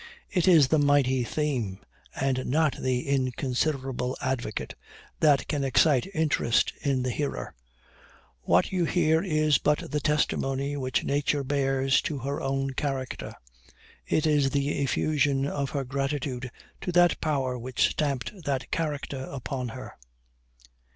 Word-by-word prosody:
It 180 Hz, -3 st, +1 dB
is 160 Hz, -7 st, +6 dB
the 155 Hz, -, +3 dB
mighty 140 Hz, -3 st, +3 dB
theme, 120 Hz, -7 st, -2 dB, 0.4 s
and 130 Hz, -1 st, -1 dB
not 155 Hz, +1 st, +2 dB
the 130 Hz, 0 st, -1 dB
inconsiderable 130 Hz, 0 st, -1 dB
advocate, 130 Hz, -5 st, -3 dB, 0.5 s
that 145 Hz, -3 st, +4 dB
can 145 Hz, -3 st, -1 dB
excite 135 Hz, +3 st, +3 dB
interest 150 Hz, -7 st, +2 dB
in 135 Hz, -4 st, 0 dB
the 125 Hz, -, -1 dB
hearer: 145 Hz, +2 st, -3 dB, 0.9 s
what 85 Hz, +2 st, +2 dB
you 180 Hz, -2 st, +1 dB
hear 160 Hz, -1 st, +2 dB
is 155 Hz, -6 st, +2 dB
but 150 Hz, +3 st, 0 dB
the 150 Hz, -, 0 dB
testimony 140 Hz, -2 st, 0 dB
which 130 Hz, -2 st, -1 dB
nature 145 Hz, 0 st, 0 dB
bears 135 Hz, -1 st, +1 dB
to 155 Hz, -4 st, -3 dB
her 140 Hz, +2 st, -3 dB
own 135 Hz, 0 st, -1 dB
character; 135 Hz, -1 st, -4 dB, 0.7 s
it 155 Hz, -, +1 dB
is 145 Hz, -3 st, +3 dB
the 140 Hz, 0 st, 0 dB
effusion 140 Hz, -1 st, +1 dB
of 140 Hz, -1 st, -2 dB
her 140 Hz, -2 st, -2 dB
gratitude 135 Hz, -1 st, -3 dB, 0.3 s
to 180 Hz, -, -2 dB
that 175 Hz, 0 st, +4 dB
power 135 Hz, -5 st, 0 dB
which 125 Hz, 0 st, +1 dB
stamped 140 Hz, -5 st, -1 dB
that 135 Hz, -2 st, -2 dB
character 145 Hz, -4 st, -3 dB
upon 130 Hz, -1 st, -4 dB
her." 130 Hz, +3 st, -8 dB
140 Hz, 135 wpm, -27 LUFS, 130-150 Hz, 0.9 s, is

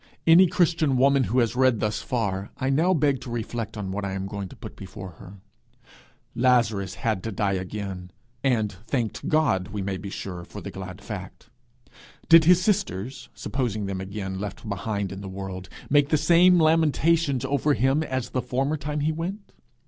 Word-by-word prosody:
Any 170 Hz, +3 st, +7 dB
Christian 165 Hz, -5 st, +2 dB
woman 135 Hz, 0 st, +4 dB
who 125 Hz, -, -1 dB
has 120 Hz, -1 st, +2 dB
read 130 Hz, -3 st, +3 dB
thus 105 Hz, -1 st, -1 dB
far, 100 Hz, -5 st, -2 dB
I 130 Hz, +1 st, 0 dB
now 160 Hz, +7 st, +3 dB
beg 145 Hz, -6 st, +2 dB
to -, -, -8 dB
reflect 115 Hz, -1 st, -4 dB
on 95 Hz, -2 st, -4 dB
what 100 Hz, +1 st, -3 dB
I 100 Hz, -1 st, -3 dB
am 95 Hz, 0 st, -3 dB
going 100 Hz, -1 st, -5 dB
to -, -, -12 dB
put -, -, -10 dB
before 95 Hz, 0 st, -9 dB
her. 95 Hz, -, -11 dB, 1.0 s
Lazarus 115 Hz, -6 st, +2 dB
had 110 Hz, -5 st, -1 dB
to 115 Hz, -, -4 dB
die 100 Hz, 0 st, 0 dB
again, 95 Hz, -1 st, -5 dB, 0.3 s
and 115 Hz, -6 st, +1 dB, 0.2 s
thanked 120 Hz, -6 st, -2 dB
God, 150 Hz, -, +2 dB
we 100 Hz, -1 st, -4 dB
may 95 Hz, 0 st, -2 dB
be 100 Hz, -, -7 dB
sure, 90 Hz, -3 st, -6 dB
for -, -, -9 dB
the -, -, -7 dB
glad 95 Hz, +1 st, -8 dB
fact. 105 Hz, +2 st, -8 dB, 0.8 s
Did 165 Hz, -1 st, +8 dB
his 180 Hz, +1 st, +6 dB
sisters, 135 Hz, -, -1 dB
supposing 115 Hz, -6 st, -2 dB
them 95 Hz, -1 st, -3 dB
again 95 Hz, -1 st, -5 dB
left 105 Hz, +3 st, -6 dB
behind 100 Hz, -1 st, -3 dB
him 95 Hz, -, -6 dB
in -, -, -7 dB
the 95 Hz, -, -7 dB
world, 95 Hz, -1 st, -6 dB, 0.2 s
make 145 Hz, 0 st, +3 dB
the 155 Hz, -, +3 dB
same 175 Hz, +4 st, +5 dB
lamentations 160 Hz, -3 st, +3 dB
over 140 Hz, +2 st, +1 dB
him 135 Hz, +5 st, +2 dB
as 130 Hz, -5 st, -3 dB
the 130 Hz, -, 0 dB
former 135 Hz, +5 st, -1 dB
time 145 Hz, +1 st, -3 dB
he 155 Hz, +2 st, +1 dB
went? 180 Hz, +6 st, -5 dB
120 Hz, 185 wpm, -25 LUFS, 100-145 Hz, 1.0 s, Did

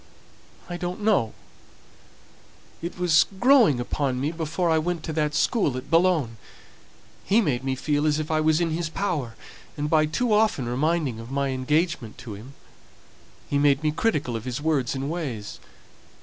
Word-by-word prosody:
"I 175 Hz, -, -5 dB
don't 180 Hz, +3 st, -4 dB
know. 200 Hz, -, +2 dB, 1.5 s
It 170 Hz, +2 st, -5 dB
was 175 Hz, -3 st, +4 dB
growing 240 Hz, -, +5 dB
upon 130 Hz, +1 st, -1 dB
me 145 Hz, +4 st, -1 dB
before 165 Hz, +2 st, -2 dB
I 160 Hz, -, +3 dB
went 170 Hz, 0 st, -2 dB
to 160 Hz, -, -4 dB
that 150 Hz, -1 st, 0 dB
school 150 Hz, -, +1 dB
at 130 Hz, +5 st, -8 dB
Boulogne. 165 Hz, -9 st, +2 dB, 0.9 s
He 205 Hz, +4 st, +3 dB
made 135 Hz, -, 0 dB
me 135 Hz, -1 st, -1 dB
feel 145 Hz, +3 st, 0 dB
as 150 Hz, -1 st, +2 dB
if 155 Hz, 0 st, -3 dB
I 155 Hz, 0 st, +2 dB
was 155 Hz, 0 st, +3 dB
in 170 Hz, -2 st, 0 dB
his 165 Hz, 0 st, -2 dB
power; 155 Hz, -, -2 dB, 0.4 s
and 150 Hz, +1 st, -2 dB
by 155 Hz, -1 st, +4 dB
too 225 Hz, +9 st, 0 dB
often 210 Hz, -, +2 dB
reminding 140 Hz, 0 st, 0 dB
me -, -, -7 dB
of 115 Hz, -, -10 dB
my 140 Hz, 0 st, -1 dB
engagement 135 Hz, -2 st, -1 dB
to 115 Hz, -, -8 dB
him, 120 Hz, +7 st, -11 dB, 0.9 s
he 140 Hz, -, 0 dB
made 145 Hz, 0 st, +3 dB
me 155 Hz, -, +2 dB
critical 150 Hz, -, -1 dB
of 115 Hz, +1 st, -5 dB
his 125 Hz, +1 st, -3 dB
words 145 Hz, -5 st, 0 dB
and 135 Hz, +1 st, -3 dB
ways. 140 Hz, -11 st, -5 dB
150 Hz, 175 wpm, -25 LUFS, 130-170 Hz, 1.5 s, growing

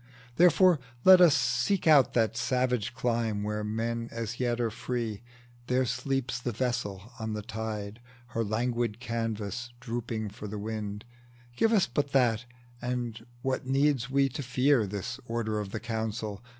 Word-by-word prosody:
Therefore 180 Hz, 0 st, +6 dB, 0.2 s
let 185 Hz, -1 st, +9 dB
us 165 Hz, -6 st, +7 dB
Seek 125 Hz, +9 st, +1 dB
out 150 Hz, -5 st, +6 dB
that 115 Hz, -1 st, +2 dB
savage 125 Hz, 0 st, 0 dB
clime, 115 Hz, -4 st, 0 dB
where 105 Hz, 0 st, -2 dB
men 115 Hz, +2 st, -2 dB
as 115 Hz, 0 st, -4 dB
yet 120 Hz, -1 st, 0 dB
Are 115 Hz, -2 st, 0 dB
free: 115 Hz, -3 st, -3 dB, 0.5 s
there 130 Hz, +1 st, +2 dB
sleeps 135 Hz, 0 st, -1 dB
the 125 Hz, 0 st, -2 dB
vessel 115 Hz, -3 st, -3 dB
on 110 Hz, -1 st, -3 dB
the 105 Hz, -1 st, -4 dB
tide, 110 Hz, -1 st, -5 dB, 0.3 s
Her 115 Hz, -1 st, -1 dB
languid 115 Hz, +1 st, -1 dB
canvas 115 Hz, -1 st, -3 dB
drooping 115 Hz, -3 st, -3 dB
for 105 Hz, +1 st, -8 dB
the 105 Hz, +1 st, -5 dB
wind; 105 Hz, 0 st, -4 dB, 0.5 s
Give 225 Hz, -, +3 dB
us 210 Hz, -5 st, +4 dB
but 140 Hz, +3 st, -2 dB
that, 125 Hz, -3 st, +3 dB, 0.4 s
and 120 Hz, -2 st, -3 dB, 0.2 s
what 130 Hz, 0 st, -1 dB
need 135 Hz, -2 st, +2 dB
we 135 Hz, +1 st, +3 dB
to 140 Hz, +3 st, -5 dB
fear 125 Hz, -2 st, +2 dB
This 105 Hz, +6 st, -4 dB
Order 110 Hz, -2 st, -1 dB
of 105 Hz, -2 st, -4 dB
the 110 Hz, -, -4 dB
Council? 110 Hz, -2 st, -3 dB
115 Hz, 155 wpm, -29 LUFS, 110-125 Hz, 0.5 s, let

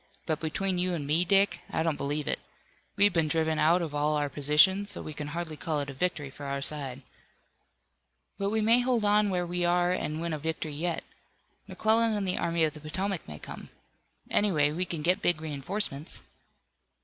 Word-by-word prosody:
But 155 Hz, -2 st, -1 dB
between 180 Hz, +4 st, -1 dB
you 180 Hz, 0 st, 0 dB
and 150 Hz, -4 st, -4 dB
me, 155 Hz, +5 st, +3 dB
Dick, 195 Hz, +2 st, +3 dB
I 160 Hz, -, -1 dB
don't 165 Hz, -2 st, 0 dB
believe 145 Hz, +1 st, -2 dB
it. -, -, 0 dB, 0.6 s
We've 205 Hz, -1 st, +4 dB
been 165 Hz, -2 st, +2 dB
driven 160 Hz, 0 st, +1 dB
out 170 Hz, +3 st, +4 dB
of 155 Hz, -3 st, -5 dB
all 150 Hz, +1 st, +1 dB
our 145 Hz, -1 st, 0 dB
positions, 150 Hz, +9 st, +3 dB
so 200 Hz, -, -5 dB
we 155 Hz, -, -6 dB
can 150 Hz, 0 st, -5 dB
hardly 160 Hz, +1 st, -4 dB
call 155 Hz, 0 st, -2 dB
it 140 Hz, -1 st, -4 dB
a -, -, -9 dB
victory 150 Hz, -2 st, -2 dB
for 140 Hz, +1 st, -8 dB
our 140 Hz, 0 st, -2 dB
side." 140 Hz, -2 st, -1 dB, 1.4 s
"But 200 Hz, 0 st, 0 dB
we 220 Hz, +1 st, 0 dB
may 230 Hz, +3 st, +5 dB
hold 245 Hz, -3 st, +1 dB
on 210 Hz, 0 st, +4 dB
where 180 Hz, -2 st, 0 dB
we 175 Hz, 0 st, -2 dB
are 175 Hz, 0 st, +2 dB
and 155 Hz, -4 st, -2 dB
win 170 Hz, 0 st, -2 dB
a 155 Hz, -, -3 dB
victory 160 Hz, 0 st, -3 dB
yet. 170 Hz, +3 st, -2 dB, 0.6 s
McClellan 225 Hz, +1 st, +2 dB
and 205 Hz, -2 st, -1 dB
the 180 Hz, -, 0 dB
Army 170 Hz, -1 st, +1 dB
of 155 Hz, -1 st, +1 dB
the 150 Hz, -, -11 dB
Potomac 185 Hz, +4 st, -3 dB
may 75 Hz, -1 st, -7 dB
come. -, -, -9 dB, 0.6 s
Anyway, 155 Hz, -8 st, +3 dB
we 175 Hz, +4 st, -1 dB
can 165 Hz, -3 st, -4 dB
get 180 Hz, +3 st, +2 dB
big 175 Hz, -3 st, +2 dB
reinforcements." 155 Hz, +1 st, -2 dB
165 Hz, 200 wpm, -28 LUFS, 150-185 Hz, 1.4 s, may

